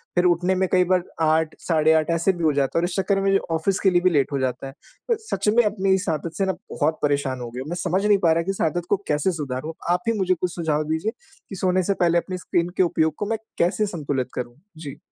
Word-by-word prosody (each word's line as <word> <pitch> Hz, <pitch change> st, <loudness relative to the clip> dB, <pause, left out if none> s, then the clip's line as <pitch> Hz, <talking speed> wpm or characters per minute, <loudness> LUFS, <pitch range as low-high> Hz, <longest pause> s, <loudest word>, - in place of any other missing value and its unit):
फिर 175 Hz, 0 st, +3 dB
उठने 180 Hz, +1 st, +2 dB
में 190 Hz, 0 st, +1 dB
कई 180 Hz, -1 st, +5 dB
बार 180 Hz, -1 st, +3 dB, 0.2 s
8 160 Hz, 0 st, +2 dB
साढ़े 160 Hz, -2 st, +3 dB
8 155 Hz, 0 st, +2 dB
ऐसे 170 Hz, +3 st, +2 dB
भी 170 Hz, -2 st, -6 dB
हो 155 Hz, -, +3 dB
जाता 140 Hz, +1 st, 0 dB
है 165 Hz, -, +3 dB
और -, -, +1 dB
इस 175 Hz, -, -4 dB
चक्कर 195 Hz, +1 st, +1 dB
में -, -, -2 dB
मेरे 195 Hz, 0 st, +4 dB, 0.2 s
ऑफ़िस 185 Hz, +4 st, 0 dB
के 195 Hz, -, +4 dB
लिए 175 Hz, -1 st, +3 dB
भी 185 Hz, -, +4 dB
लेट 145 Hz, -3 st, +1 dB
हो 140 Hz, -, 0 dB
जाता 130 Hz, 0 st, -2 dB
है। 135 Hz, -, -9 dB, 0.4 s
अ, -, -, +5 dB
सच 215 Hz, -, -1 dB
में 240 Hz, -, +7 dB
अपनी 195 Hz, -2 st, +1 dB
इस 190 Hz, -, -3 dB
आदत 160 Hz, +1 st, -3 dB
से 195 Hz, -, +1 dB
ना 190 Hz, -, 0 dB, 0.2 s
बहुत 155 Hz, +1 st, 0 dB
परेशान 140 Hz, -3 st, 0 dB
हो 120 Hz, -, -5 dB
गया 125 Hz, +2 st, -6 dB
हूँ, 145 Hz, -, -9 dB
मैं 175 Hz, -, -3 dB
समझ 185 Hz, +3 st, 0 dB
नहीं 205 Hz, -1 st, +5 dB
पा 165 Hz, -, +5 dB
रहा 165 Hz, +1 st, 0 dB
कि 195 Hz, -, -1 dB
इस 195 Hz, -, -5 dB
आदत 175 Hz, -1 st, -3 dB
को 205 Hz, -, +3 dB
कैसे 150 Hz, +5 st, +1 dB
सुधारूँ, 150 Hz, 0 st, -4 dB, 0.2 s
आप 180 Hz, +5 st, +1 dB
ही -, -, +2 dB
मुझे 185 Hz, -1 st, +2 dB
कुछ 180 Hz, 0 st, -3 dB
सुझाव 155 Hz, -3 st, 0 dB
दीजिए, 160 Hz, +7 st, -1 dB, 0.4 s
कि 195 Hz, -, -6 dB
सोने 185 Hz, 0 st, +1 dB
से 200 Hz, +3 st, +1 dB
पहले 170 Hz, 0 st, +3 dB
अपनी 185 Hz, +1 st, -5 dB
स्क्रीन 175 Hz, 0 st, -1 dB
के -, -, +5 dB
उपयोग 160 Hz, -2 st, +1 dB
को -, -, -1 dB
मैं 225 Hz, -, +1 dB, 0.2 s
कैसे 190 Hz, +5 st, +2 dB
संतुलित 140 Hz, -7 st, -3 dB
करूँ? 120 Hz, -1 st, -5 dB, 0.2 s
जी। 145 Hz, -4 st, -8 dB
170 Hz, 280 wpm, -23 LUFS, 155-190 Hz, 0.4 s, में